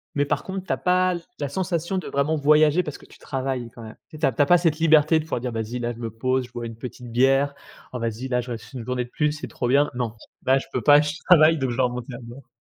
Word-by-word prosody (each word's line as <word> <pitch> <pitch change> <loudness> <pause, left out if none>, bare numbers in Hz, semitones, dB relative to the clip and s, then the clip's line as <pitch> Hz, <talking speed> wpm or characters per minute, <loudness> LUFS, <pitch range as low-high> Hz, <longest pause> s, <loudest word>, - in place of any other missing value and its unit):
Mais 145 0 +2
par 145 0 -1
contre 190 0 -5
tu - - -1
as - - -2
pas 185 0 +2 0.3
la 145 - -2
sensation 175 +2 -2
de 180 - -8
vraiment 140 +3 0
voyager, 150 +2 +4
parce 150 -4 -6
que - - -17
tu - - -18
travailles 130 -3 -3
quand 115 0 -12
même. 110 -1 -10
Tu 160 - -13
sais, - - -13
tu 115 - +1
as - - +5
pas 175 - +6
cette 165 -2 0
liberté 160 0 +5
de - - -4
pouvoir 160 -5 -3
dire: 125 0 -3
«Vas-y 115 +1 -4
là 120 0 -2
je 115 - -13
me 115 -1 -4
pose, 130 +3 -1
je - - -27
bois 120 -1 -6
une 115 -1 -7
petite 125 0 -9
bière. 135 +3 +3 0.4
Oh, 125 - -4
vas-y 115 +2 -3
là 125 -1 0
je 125 - -10
reste 115 +1 -8
1 125 -3 -6
journée 125 0 -2
de - - -18
plus 150 -1 +1
c'est 150 - -6
trop 125 - -3
bien». 140 +4 +3
Non, 120 -2 -3 0.3
là 130 +1 +4
je 135 - -4
peux 125 - -1
pas, 145 +2 +7
je 150 0 -2 0.2
travaille 160 -2 +7
donc 130 -1 -1
je - - -3
dois 130 - +3
remonter 125 +1 -5
à - - -7
bord. 120 +3 -12
135 Hz, 295 wpm, -24 LUFS, 120-155 Hz, 0.4 s, pas